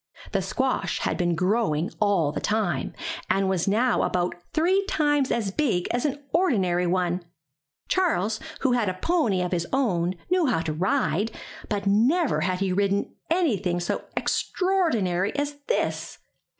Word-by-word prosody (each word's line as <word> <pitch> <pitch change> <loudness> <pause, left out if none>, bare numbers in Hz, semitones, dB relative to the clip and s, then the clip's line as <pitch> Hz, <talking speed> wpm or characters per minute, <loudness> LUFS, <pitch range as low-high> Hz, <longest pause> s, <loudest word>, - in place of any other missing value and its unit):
The - - +1
squash - - -1
had - - 0
been 175 -2 +1
growing 185 -4 +1
all 195 -8 +2
the - - -3
time, 205 -10 -1 0.4
and 195 0 +2
was 190 -2 0
now 235 +5 +2
about 180 0 0 0.2
three 370 +5 +2
times 290 -6 +1
as 210 -4 0
big 195 -8 0
as 245 +3 0
an 285 0 -5
ordinary 190 - +2
one. 180 0 0 0.6
Charles, 225 - +1 0.2
who 265 - +2
had 240 -5 +2
a 185 - -3
pony 215 - +1
of 180 - -3
his 170 -2 -1
own, 185 -10 +1 0.2
knew 365 -4 +3
how 230 -10 +1
to 160 -2 -2
ride, 205 - +1 0.4
but 205 -2 -2
never 235 - +3
had 180 +2 -1
he 190 -2 +1
ridden 200 +1 0 0.2
anything 210 - +1
so 175 - -2
extraordinary 230 - 0
as 290 0 -2
this. - - -1
205 Hz, 150 wpm, -25 LUFS, 180-280 Hz, 0.6 s, knew